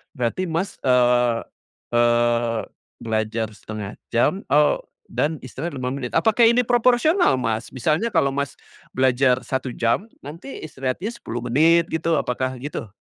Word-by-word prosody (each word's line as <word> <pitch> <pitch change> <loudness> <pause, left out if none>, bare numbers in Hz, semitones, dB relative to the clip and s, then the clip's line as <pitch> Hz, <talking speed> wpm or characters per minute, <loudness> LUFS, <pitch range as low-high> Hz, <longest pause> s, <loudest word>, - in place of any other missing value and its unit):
berarti 125 +9 -1
Mas, 170 +5 -2
eee 125 -2 +3 0.6
eee, 120 -1 +2 0.4
belajar 110 0 -1
1/2 105 -1 -7 0.2
jam, 155 - +1
eee, 150 +1 +5 0.4
dan 155 +2 0
istirahat 145 +5 -6
5 125 -1 -3
menit. 125 -3 -5
Apakah 225 +1 +3
ini 245 +2 +4
proporsional 245 - +3
Mas? 115 -1 -2
Misalnya 155 - +1
kalau 140 -8 +2
Mas, 140 0 -2 0.4
belajar 130 0 +3
1 130 -1 -2
jam 120 - 0 0.2
nanti 165 - -8
istirahatnya 140 - -3
10 120 - -6
menit, 160 +7 +4
gitu. 165 0 0
Apakah 130 +1 -2
gitu? 140 -4 -5
130 Hz, 135 wpm, -22 LUFS, 120-165 Hz, 0.6 s, eee